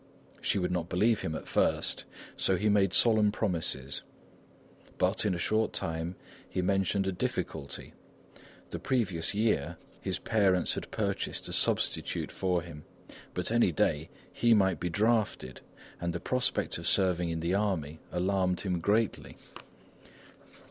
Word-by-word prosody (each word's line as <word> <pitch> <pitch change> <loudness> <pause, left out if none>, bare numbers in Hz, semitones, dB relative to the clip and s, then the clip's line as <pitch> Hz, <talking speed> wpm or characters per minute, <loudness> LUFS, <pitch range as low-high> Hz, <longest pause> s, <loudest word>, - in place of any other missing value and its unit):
She - - +1
would 90 -2 0
not 85 -1 -2
believe 105 +5 +2
him 80 - -3
at - - -7
first, - - +1 0.3
so 95 - +2
he 105 +3 +1
made 100 -2 +3
solemn 110 +1 +5
promises. 80 -10 -1 1.0
But, 95 +4 +1
in 95 - +1
a - - -3
short 110 +5 +1
time 80 +2 -2 0.3
he 90 - -1
mentioned 95 +1 +1
a 95 - 0
difficulty; 70 -5 -4 0.8
the - - -4
previous 105 -10 0
year, 90 -7 +1 0.2
his - - -2
parents 95 -5 +2
had - - -5
purchased - - -2
a - - -5
substitute - - 0
for 90 -3 0
him; 80 -3 -10 0.5
but 90 +3 -1
any 120 -6 +4
day 75 0 0 0.2
he 120 -1 +4
might 95 -2 +2
be 90 - -2
drafted 105 - 0 0.4
and 85 -1 -2
the 85 - -3
prospect 125 +7 -1
of - - -4
serving 90 -3 +2
in 80 0 -2
the 85 +3 -1
army 90 -7 -1
alarmed 90 0 +1
him 90 -3 -1
greatly. 105 +5 0
95 Hz, 145 wpm, -30 LUFS, 85-105 Hz, 1.0 s, solemn